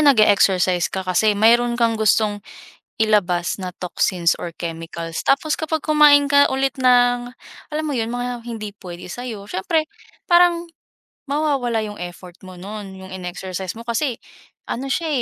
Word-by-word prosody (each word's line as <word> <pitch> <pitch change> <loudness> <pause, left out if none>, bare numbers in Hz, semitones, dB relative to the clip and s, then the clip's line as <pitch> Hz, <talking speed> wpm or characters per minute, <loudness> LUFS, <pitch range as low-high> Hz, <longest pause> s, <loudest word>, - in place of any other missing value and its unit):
nag-e-exercise 200 - +4
ka 190 0 -4
kasi 200 +3 +2
mayroon 235 +3 +4
kang 230 -1 +2
gustong 215 -1 +1 0.6
ilabas 195 -5 +2
na 185 -2 -6
toxins 175 -1 +1
or 170 - -6
chemicals 165 0 -6
tapos 300 +3 +2
kapag 315 0 -2
kumain 295 -2 +5
ka 285 0 +4
ulit 270 +1 0
ng, 245 -1 +3 0.4
alam 310 +1 -2
mo 290 - -2
yun 230 -1 -2
mga 245 -1 -4
hindi 215 -3 -5
puwede 175 -3 -10
sayo 240 -3 -6
siyempre 310 - 0 0.4
parang 345 -1 +4 0.6
mawawala 275 -5 0
yung 210 -1 -6
effort 175 0 -9
mo 185 -1 -11
no'n 200 0 -8
yung 190 0 -11
in-exercise 185 +1 -5
mo - - -8
kasi 235 +2 -1 0.5
ano 265 +3 -4
siya, 330 +3 -1
220 Hz, 145 wpm, -21 LUFS, 185-270 Hz, 0.6 s, kumain